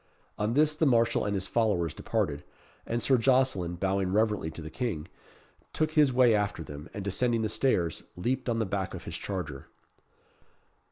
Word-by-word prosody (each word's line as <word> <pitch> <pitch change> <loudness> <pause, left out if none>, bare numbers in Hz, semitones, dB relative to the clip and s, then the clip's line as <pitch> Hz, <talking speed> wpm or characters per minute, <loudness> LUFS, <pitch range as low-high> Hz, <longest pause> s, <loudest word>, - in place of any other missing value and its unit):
On 105 +3 0
this 155 +1 +4
the 155 0 +1
marshal 115 -3 +3
and 100 - -1
his 95 -1 -1
followers 100 -9 +1
departed; 70 0 -2 0.4
and 115 0 -1
Sir 130 -3 +4
Jocelyn, 120 -8 +2
bowing 95 +1 0
reverently 105 -5 +1
to 80 - -8
the 80 - -8
King, 90 -11 -3 0.7
took 155 0 0
his 150 -3 +4
way 125 -2 +5
after 105 -5 0
them, 75 +1 -9
and 100 -2 -5
descending 115 +3 +1
the 110 - 0
stairs, 90 - +1 0.2
leaped 125 +7 -1
on 115 - +1
the 110 - +1
back 95 -1 -3
of - - -8
his - - -6
charger. 85 -9 -5
105 Hz, 175 wpm, -29 LUFS, 90-125 Hz, 0.7 s, way